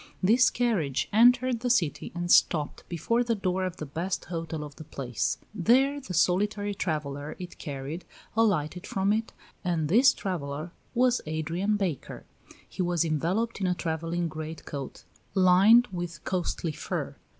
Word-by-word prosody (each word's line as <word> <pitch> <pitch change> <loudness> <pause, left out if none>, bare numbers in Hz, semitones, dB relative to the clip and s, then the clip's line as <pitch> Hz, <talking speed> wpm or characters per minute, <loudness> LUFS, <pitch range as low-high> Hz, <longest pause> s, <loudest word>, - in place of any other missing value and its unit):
This 235 +7 +5
carriage 165 - 0
entered 245 +2 +5
the 245 +1 -2
city 180 -11 +1
and 175 0 -2
stopped 150 -4 +3
before 230 +9 +1
the 235 -1 0
door 185 -2 -1
of 185 -1 -4
the 155 - -5
best 170 +6 -3
hotel 165 -2 -4
of 145 -1 -10
the - - -8
place; 120 -10 -2 0.2
there 265 +9 +3
the 185 -9 -6
solitary 205 +4 +1
traveller 150 -5 -3
it 180 -1 -9
carried 145 +3 -5 0.3
alighted 180 -6 +1
from 195 +1 +1
it, 220 +1 -2 0.3
and 165 -5 0
this 245 +9 +6
traveller 155 -3 -4 0.2
was 250 0 +3
Adrian 165 +7 -1
Baker. 180 -9 -4 0.4
He - - -5
was 175 -2 +1
enveloped 180 +9 -1
in 190 - +1
a 180 - +1
travelling 165 +1 -2
great 155 0 -7
coat 140 -3 -7 0.3
lined 195 +6 +6
with 175 -3 -5
costly 175 -2 -2
fur. - - -4
175 Hz, 150 wpm, -28 LUFS, 155-210 Hz, 0.4 s, this